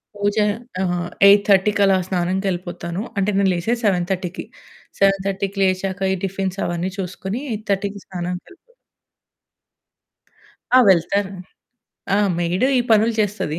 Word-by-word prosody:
పూజ, 205 0 -1 0.5
ఆహ్, 175 -2 -1 0.2
8:30కి 200 0 +4
అలా 195 -1 +4
స్నానం 180 0 -1
కెళ్ళిపోతాను. 175 -1 -3 0.2
అంటే 200 +1 +1
నేను 195 -1 +3
లేసేది 225 +8 -1
7:30కి. 185 -1 -1 0.5
7:30కి 195 0 0
లేచాక 190 +1 -1
ఈ - - 0
టిఫిన్స్ 195 0 -3
అవన్నీ 175 +2 -2
చూసుకొని 190 +5 -4
8:30కి 205 -1 -3
స్నానానికెళ్ళిపోతా. 180 - -7 2.0
ఆ! - - +9
వెళ్తాను. 190 +2 +2 0.8
ఆ! - - +4 0.2
మెయిడ్ 175 +5 0
ఈ - - +3
పనులు 220 +1 +4
చేస్తది. 205 -7 -2
190 Hz, 110 wpm, -20 LUFS, 180-200 Hz, 2.0 s, ఆ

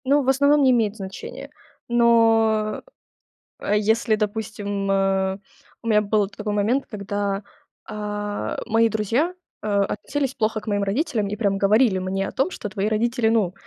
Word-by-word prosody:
Ну, 285 +2 +3
в 260 - 0
основном, 285 +2 +4
не 260 - +5
имеет 225 -4 +1
значения. 190 -2 -8 0.4
Но. 225 -2 +3 0.8
Э, 210 - +1
если, 220 +1 +2
допустим, 205 -2 -3
э 195 -1 +1 0.4
У 230 - -8
меня 210 -2 +4
был 210 -1 +1
т 205 - -17
такой 210 -1 -3
момент, 220 +7 +1
когда, 200 -1 -3 0.4
а, 210 -1 -4
мои 225 0 +3
друзья, 230 - 0 0.3
э, - - -3
относились 210 +7 -1
плохо 220 -2 0
к - - -17
моим 205 -1 0
родителям 220 +1 -1
и 205 - -3
прям 200 -3 0
говорили 205 +1 +3
мне 190 +1 -2
о - - -6
том, 275 +8 0
что 210 - -6
"твои 200 0 -2
родители, 235 +2 +1
ну, 215 -6 +1
215 Hz, 160 wpm, -23 LUFS, 200-230 Hz, 0.8 s, не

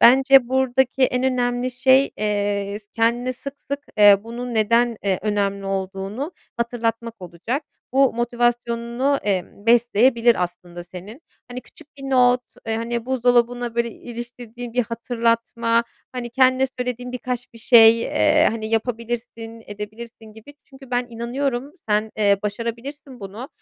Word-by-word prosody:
Bence 265 +1 +6
buradaki 265 0 +1
en 250 0 +2
önemli 250 -1 0
şey, 260 +2 +4
eee, 205 -1 -1
s 210 - -24
kendine 235 +2 +1
sık 275 +3 -9
sık, 280 0 -1 0.2
eee, 205 -1 +8
bunun 240 +1 -6
neden, 230 +2 +2
eee, 190 -2 +1
önemli 200 -1 -1
olduğunu 195 - -4 0.2
hatırlatmak 230 -1 -2
olacak. 180 - -4 0.3
Bu 270 0 +4
motivasyonunu, 240 +2 0
emm, 200 +1 -3
besleyebilir 235 -1 +4
aslında 175 0 -6
senin. 185 - -11 0.3
Hani, 245 +1 -6
küçük 305 +4 -19
bir 275 - -12
not, 250 -1 +4 0.3
eee, 225 0 -1
hani, 235 +1 -3
buzdolabına, 245 -2 +1
böyle, 235 0 0
iliştirdiğin 240 0 -9
bir 245 +1 +2
hatırlatma, 230 0 0 0.3
hani, 245 -1 -5
kendine 260 +1 +3
söylediğin 250 0 -4
birkaç 250 -1 -5
bir 230 - -13
şey, 230 -1 +7
eee, 305 +3 +3
hani, 220 -1 -4
"Yapabilirsin, 230 0 -4
edebilirsin!" 215 +3 -9
gibi, 220 +7 -14
çünkü 270 -1 -16
ben 245 0 0
inanıyorum, 245 +3 -3 0.2
sen, 210 +1 +1
eee, 205 -2 +3
başarabilirsin 235 +5 -5
bunu. 205 +7 -8
235 Hz, 135 wpm, -22 LUFS, 220-250 Hz, 0.3 s, eee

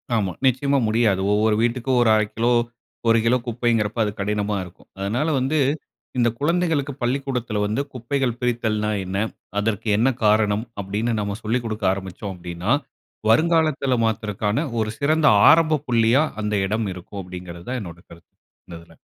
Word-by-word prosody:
ஆமா, 100 -5 0
நிச்சயமா 140 +2 +2
முடியாது. 110 -4 +2
ஒவ்வொரு 105 +1 +3
வீட்டுக்கும் 125 +2 0
1/2 110 -2 +4
கிலோ, 115 +2 +2 0.6
1 115 0 +5
கிலோ 125 +2 +4
குப்பைங்கிறப்ப, 115 -2 0
அது 105 - -1
கடினமா 105 +1 -1
இருக்கும். 90 0 -15
அதனால 115 +10 -1
வந்து, 135 +4 0 0.6
இந்த 120 -1 +3
குழந்தைகளுக்கு 155 -3 0
பள்ளிக்கூடத்தில 125 -4 -1
வந்து, 110 +7 -1
"குப்பைகள் 125 0 -2
பிரித்தல்ன்னா 110 -3 0
என்ன? 95 +2 -3 0.4
அதற்கு 105 +1 -2
என்ன 120 +5 +3 0.2
காரணம்?" 105 +1 +3 0.2
அப்படின்னு 105 +5 -2
நம்ம 100 0 -3
சொல்லிக் 115 +3 -1
குடுக்க 110 -2 -3
ஆரம்பிச்சோம் 95 +1 -6
அப்படின்னா, 85 +3 -4 0.6
வருங்காலத்துல 155 0 +3
மாத்துறக்கான 105 +3 -1 0.2
ஒரு 110 -1 0
சிறந்த 155 +2 +2 0.2
ஆரம்பப் 155 -3 +4
புள்ளியா, 120 +4 +3 0.2
அந்த 105 0 -2
இடம் 110 +1 -1
இருக்கும் 95 +3 -8
அப்படிங்கிறது 90 -1 -9
தான் 130 0 -2
என்னோட 85 -3 -9
கருத்து. 85 0 -17 0.3
இந்த 85 - -8
இதுல. 85 -1 -18
110 Hz, 145 wpm, -22 LUFS, 105-125 Hz, 0.6 s, 1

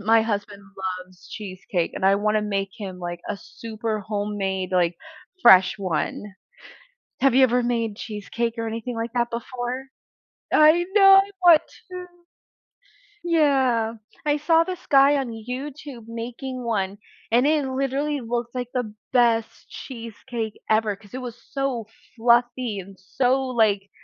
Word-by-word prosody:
my 225 +2 +4
husband 205 -2 -3 0.4
loves 185 -2 -19
cheesecake, 190 -4 -4
and - - -4
I 195 +1 +6
wanna 210 +1 +1
make 195 -2 -2
him, 190 -3 -7
like, 175 -1 -5
a - - -2
super 220 0 -5
homemade, 200 -2 -3
like, 175 -2 +2 0.5
fresh 190 +3 +7
one. 190 +2 -3 0.9
Have 270 -1 +4
you 265 - +7
ever 245 0 +3
made 230 -3 -1
cheesecake 225 +2 -4
or 230 0 -2
anything 230 +2 -4
like 230 +1 -4
that 240 -1 +1
before? 245 +2 -4 0.6
I 310 +3 +6
know, 390 -2 +8
I 390 +1 +3
want 335 -3 +8 0.3
to! 360 0 -6 1.2
Yeah. 270 -9 +2 0.3
I 295 0 +2
saw 325 +2 +4
this 365 +1 -6
guy 275 +1 +6
on 270 -3 -2
YouTube 250 +2 -7
making 245 +3 -6
one, 200 -4 -1 0.3
and 240 +3 +4
it 300 -2 +2
literally 275 +2 -1
looks 240 0 -3
like 250 -1 -2
the 245 -4 -2 0.2
best 235 -3 +1
cheesecake 230 -2 -7
ever 215 -1 +2
'cause 200 0 -19
it 255 - -5
was 245 -1 -8
so 270 -5 -2 0.3
fluffy 240 -1 +2
and 195 +1 -11
so, 250 +7 +1
like 210 -5 +1
230 Hz, 140 wpm, -24 LUFS, 205-260 Hz, 1.2 s, know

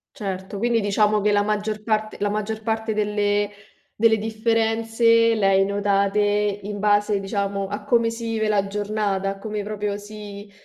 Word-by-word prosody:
Certo, 195 -4 -5
quindi 235 0 +2
diciamo 210 0 +2
che 210 +1 +2
la 205 0 +3
maggior 210 0 -2
parte 215 -1 -1
la 205 - 0
maggior 215 +1 -3
parte 220 0 -1
delle 205 -1 0 0.5
delle 220 0 +4
differenze 225 +1 +2
le 210 -3 +2
hai 195 0 +4
notate 200 0 +1
in 205 0 0
base, 205 0 +2
diciamo, 200 0 -2
a 205 +1 -5
come 230 +1 +2
si 230 0 -5
vive 220 -1 0
la 200 -2 +1
giornata, 205 -1 -1
a 195 - -8
come 210 0 -4
proprio 205 -1 -3
si 205 -1 -10
210 Hz, 165 wpm, -23 LUFS, 205-220 Hz, 0.5 s, delle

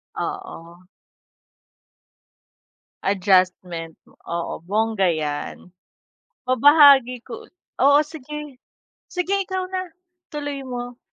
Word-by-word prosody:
Oo. 170 +2 -7 2.2
Adjustment, 185 -4 +1 0.3
oo, 170 -1 -4
bongga 205 0 +1
'yan. 155 +3 -4 0.8
Mabahagi 270 -2 +6
ko 235 -2 -10 0.4
oo, 285 +1 +7
sige. 300 -2 -7 0.5
Sige 360 +2 -2
ikaw 375 -1 -2
na, 370 -1 -3 0.4
tuloy 290 -2 -5
mo. 245 -1 -6
245 Hz, 75 wpm, -22 LUFS, 180-290 Hz, 2.2 s, oo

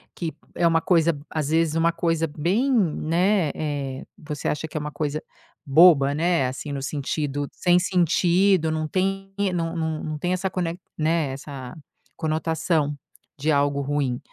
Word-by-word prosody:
que 165 -3 -4 0.2
é 170 - +3
uma 165 -1 +3
coisa 165 -3 +3
às 155 -3 -2
vezes 160 0 +2
uma 165 +1 +3
coisa 165 -1 0
bem, 180 - 0
né, 180 - +2
eh, 140 -3 -4
você 150 -2 -5
acha 150 +2 -2
que 155 - -6
é - - 0
uma 150 0 -5
coisa 150 0 -3 0.4
boba, 140 -1 +6
né, 165 -2 +1
assim, 135 +3 -5
no 140 - -3
sentido 145 0 -2
sem 175 0 +3
sentido, 180 0 +3
não 155 0 -1
tem, 195 +3 -1 0.2
não 165 -1 -2
não 160 -2 -2
não 155 -1 -4
tem 175 +4 -1
essa 185 +1 -1
conec 175 -2 -3 0.2
né, 160 -2 +1
essa 135 -2 -8 0.4
conotação 160 -1 0 0.4
de 155 +3 +1
algo 140 -1 +2
ruim, 140 -3 -1
160 Hz, 160 wpm, -24 LUFS, 145-175 Hz, 0.4 s, boba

